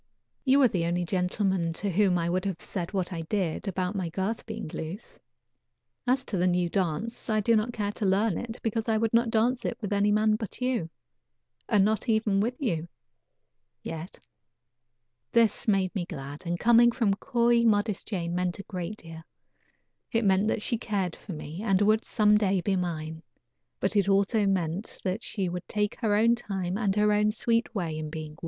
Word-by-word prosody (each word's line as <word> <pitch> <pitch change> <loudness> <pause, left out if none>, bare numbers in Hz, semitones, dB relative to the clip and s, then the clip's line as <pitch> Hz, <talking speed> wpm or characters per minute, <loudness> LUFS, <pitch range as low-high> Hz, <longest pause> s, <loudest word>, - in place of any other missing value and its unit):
You 270 +1 +5
are - - +7
the 180 -6 -1
only 175 +1 0
gentleman 180 -1 0
to 200 +4 -2
whom 190 0 +3
I 170 -1 -1
would 180 +1 0
have 190 -4 -2
said 175 -4 -5
what 190 -2 -2
I 165 - -3
did 180 +1 -2
about 185 0 -1
my 185 -4 -2
girth 195 +8 -3
being 220 -3 -5
loose. 165 +6 -7 0.9
As 260 +1 +2
to 200 - -2
the 180 +1 +2
new 175 -1 +1
dance, 195 +7 -2
I 215 -1 +2
do 230 +2 +3
not 220 +2 +1
care 205 -3 -2
to 210 - -3
learn 195 +1 +2
it 230 -1 -6
because 225 0 -1
I 220 - +3
would 225 0 0
not 230 0 +3
dance 235 +3 +1
it - - -2
with 210 -3 -3
any 205 +1 +3
man 215 0 +3
but 215 -3 -7
you, 250 -9 -1 0.8
and 205 -4 +4
not 220 +3 0
even 220 -3 +2
with 235 +5 0
you 175 - -1 1.0
yet." 165 +2 -6 1.1
This 230 -1 +3
made 195 -3 +2
me 185 -4 -2
glad, 145 -1 -8
and 175 0 -1
coming 240 +1 +6
from 230 -5 +1
coy, 235 +1 +2
modest 210 -2 +1
Jane 170 -5 -2
meant 180 0 -1
a 200 - -7
great 185 +2 -5
deal. 165 -3 -10 0.9
It 230 -1 +1
meant 195 +1 +3
that 220 - 0
she 235 - -1
cared 195 -7 -2
for 195 - -9
me, 155 +3 -7
and 195 -4 +2
would, 215 +2 +3
some 210 -1 +4
day, 195 -2 +2
be 195 +2 0
mine; 160 -3 -3 0.6
but 195 - 0
it 200 -1 +3
also 200 +2 +3
meant 185 +1 -1
that 190 +3 -1
she 195 -6 -2
would 175 0 -5
take 210 -1 -1
her 215 -4 +2
own 230 +3 +4
time 190 -5 -3
and 200 -2 0
her 210 0 +3
own 210 0 +3
sweet 230 +1 0
way 170 -5 -2
in 155 -1 -4
being 155 -1 -6
won. 155 - -16
200 Hz, 200 wpm, -28 LUFS, 180-220 Hz, 1.1 s, are